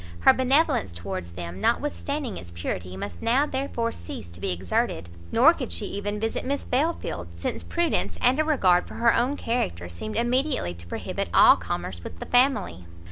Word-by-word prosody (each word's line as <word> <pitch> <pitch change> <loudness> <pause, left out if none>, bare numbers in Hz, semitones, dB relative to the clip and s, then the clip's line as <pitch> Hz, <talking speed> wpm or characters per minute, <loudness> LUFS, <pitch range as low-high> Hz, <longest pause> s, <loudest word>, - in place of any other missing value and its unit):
Her - - +7
benevolence 260 - +2
towards 85 0 -6
them, 85 +2 -7
notwithstanding 280 -1 -1
its 85 - -8
purity, 90 +2 -5
must 95 -3 -6
now 260 +5 +3
therefore 265 -5 -2
cease 85 +1 -8
to 85 - -11
be - - -2
exerted; 85 -2 -1 0.2
nor - - +6
could - - -5
she 85 - 0
even 205 +1 -3
visit 225 +1 -2
Miss 280 +2 -2
Belfield, 250 - -2
since 85 - -3
prudence, 340 -1 0
and 255 +4 +3
a - - +4
regard 190 - +3
for - - -10
her 230 0 +4
own 260 +4 +1
character, 90 - -2
seemed 90 +5 -6
immediately 250 - +1
to 85 0 -13
prohibit - - -4
all - - +8
commerce 85 -1 -5
with 85 - -8
the - - -6
family. 245 - +2
180 Hz, 180 wpm, -25 LUFS, -, 0.2 s, all